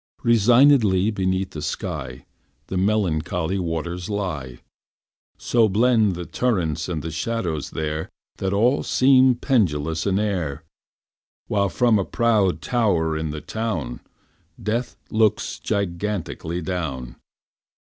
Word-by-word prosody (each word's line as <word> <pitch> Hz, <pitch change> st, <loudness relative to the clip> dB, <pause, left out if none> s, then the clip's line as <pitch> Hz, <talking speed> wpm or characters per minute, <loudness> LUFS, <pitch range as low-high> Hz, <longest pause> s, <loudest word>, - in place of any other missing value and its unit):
Resignedly 115 Hz, -3 st, +5 dB
beneath 95 Hz, -1 st, -1 dB
the 80 Hz, -, -6 dB
sky 65 Hz, -4 st, -5 dB, 0.4 s
The -, -, -3 dB
melancholy 90 Hz, -2 st, 0 dB
waters 85 Hz, +1 st, -3 dB
lie. 80 Hz, -, -3 dB, 0.8 s
So 115 Hz, -3 st, +2 dB
blend 110 Hz, -1 st, +3 dB
the 90 Hz, 0 st, -5 dB
turrets 85 Hz, -11 st, -1 dB
and 80 Hz, -3 st, -3 dB
shadows 85 Hz, -4 st, -2 dB
there 80 Hz, 0 st, -3 dB, 0.3 s
That 95 Hz, -, -2 dB
all 120 Hz, +8 st, +3 dB
seem 130 Hz, -1 st, +4 dB
pendulous 80 Hz, -, 0 dB
in 95 Hz, -1 st, +2 dB
air, 90 Hz, -8 st, -2 dB, 0.8 s
While 100 Hz, -2 st, +1 dB
from 120 Hz, -2 st, +3 dB
a -, -, +1 dB
proud 105 Hz, -4 st, +1 dB
tower 90 Hz, -10 st, +1 dB
in 80 Hz, 0 st, -2 dB
the 75 Hz, 0 st, -5 dB
town 110 Hz, -, -3 dB, 0.6 s
Death 115 Hz, +4 st, -2 dB
looks 110 Hz, -1 st, +1 dB
gigantically 90 Hz, -3 st, -3 dB
down. 75 Hz, -9 st, -4 dB
95 Hz, 110 wpm, -23 LUFS, 80-110 Hz, 0.8 s, Resignedly